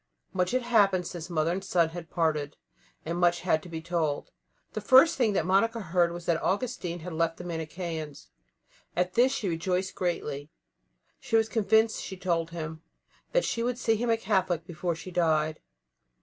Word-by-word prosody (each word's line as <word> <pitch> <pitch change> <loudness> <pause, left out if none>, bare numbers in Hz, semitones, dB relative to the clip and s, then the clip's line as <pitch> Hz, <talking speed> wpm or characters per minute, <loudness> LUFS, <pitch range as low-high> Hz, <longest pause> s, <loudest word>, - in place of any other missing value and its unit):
Much 180 -1 +1
had 255 +3 0
happened 200 -6 +3
since 170 -1 -6
mother 160 -1 +1
and 190 +2 -2
son 175 -4 +2
had 170 0 -8
parted, 155 -3 0 0.5
and 170 +2 -2
much 175 -1 +3
had 165 -3 +2
to 180 - -11
be 160 -1 -6
told. 165 -4 -1 0.4
The - - -3
first 265 +5 +6
thing 230 -5 +2
that 170 - +1
Monica 200 +5 +2
heard 175 -3 +1
was 175 0 -7
that 165 -1 +1
Augustine 185 -5 -2
had 180 +1 -6
left 165 0 0
the - - -8
Manicheans. 160 -2 -5 0.7
At 180 +1 0
this 250 +2 +4
she 225 -7 -2
rejoiced 180 +2 -1
greatly; 150 -5 -3 0.7
she 225 - -2
was 225 0 +4
convinced, 220 0 +2
she 190 - -6
told 170 -3 0
him, 160 -1 -6 0.5
that - - +2
she 230 - -1
would 245 +1 -1
see 225 -2 +2
him 235 +2 -1
a 225 - +3
Catholic 185 -6 0
before 175 0 -3
she 185 +3 -9
died. 155 -3 +1
175 Hz, 180 wpm, -28 LUFS, 165-200 Hz, 0.7 s, first